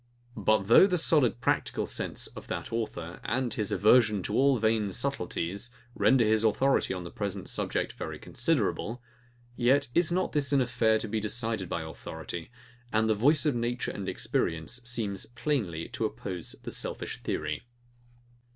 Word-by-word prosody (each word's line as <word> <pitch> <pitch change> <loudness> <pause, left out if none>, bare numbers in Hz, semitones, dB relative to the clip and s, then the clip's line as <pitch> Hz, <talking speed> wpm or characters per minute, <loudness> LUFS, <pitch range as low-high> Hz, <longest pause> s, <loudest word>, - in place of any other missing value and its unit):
] 120 - -32
But 110 -1 +2
though 115 - +7
the 180 -2 +1
solid 145 -7 +3
practical - - 0
sense - - -2
of - - -9
that - - -5
author, 90 -7 -4
and 130 -3 -1
his 105 -2 -1
aversion 105 -2 +4
to 105 - -3
all 135 +2 +4
vain 110 -2 +1
subtilties, 100 -2 -2 0.2
render 125 -2 +4
his 110 0 +3
authority 135 +5 +2
on 90 -2 -3
the 85 - -8
present 100 -2 -4
subject - - -1
very - - -6
considerable; 120 +2 -1 0.5
yet 130 +3 +3
is 175 -1 +3
not 185 +1 0
this 145 -2 +1
an 140 - +5
affair 115 -3 +2
to 110 - -3
be 110 +1 -1
decided 110 -3 -1
by 85 - -2
authority, 80 +1 -7 0.4
and 110 0 +2
the 110 - +4
voice 145 +9 +3
of 150 - +3
nature 120 +1 -1
and 100 - -4
experience 80 +9 -1
seems 110 -4 -2
plainly 115 - -2
to - - -2
oppose 90 -3 -5
the - - -5
selfish - - -4
theory. - - -3
110 Hz, 165 wpm, -29 LUFS, 100-125 Hz, 0.5 s, though